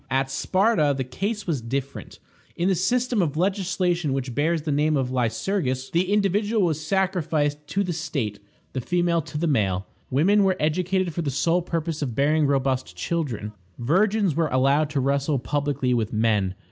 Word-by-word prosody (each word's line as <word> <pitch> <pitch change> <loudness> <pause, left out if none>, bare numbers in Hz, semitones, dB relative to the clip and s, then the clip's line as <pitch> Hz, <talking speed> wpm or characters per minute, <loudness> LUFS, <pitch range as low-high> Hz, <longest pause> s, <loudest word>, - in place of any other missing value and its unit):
At 135 0 0
Sparta 185 -1 +2
the 130 - -1
case 200 - -3
was 155 -8 -1
different. 135 +4 -5 0.4
In 175 - 0
the - - +3
system 235 +5 +1
of 155 -4 -1
legislation 180 -4 0
which 130 -2 -3
bears 155 +4 0
the 155 - -2
name 150 +1 +2
of 130 -2 -1
Lycurgus, 130 - -1
the 180 +3 +1
individual 205 +1 +2
was 155 -2 -1
sacrificed 155 -5 0
to 195 +7 0
the 180 -2 -2
state; 145 -11 -3 0.3
the 130 - -2
female 175 +3 +1
to 150 - -7
the 165 - 0
male. 100 - +1 0.2
Women 195 +10 +3
were 190 -1 +2
educated 180 +3 0
for 170 - -2
the 150 - -2
sole 165 +6 +1
purpose 165 -2 -3
of 125 -6 -3
bearing 150 +3 +3
robust 130 -7 0
children. 115 - -3 0.3
Virgins 195 - +2
were 165 +2 +1
allowed 140 +3 +3
to 145 -2 -1
wrestle 140 +2 +1
publicly 140 +1 -1
with 115 -2 0
men. 105 -4 +1
150 Hz, 170 wpm, -24 LUFS, 135-180 Hz, 0.4 s, the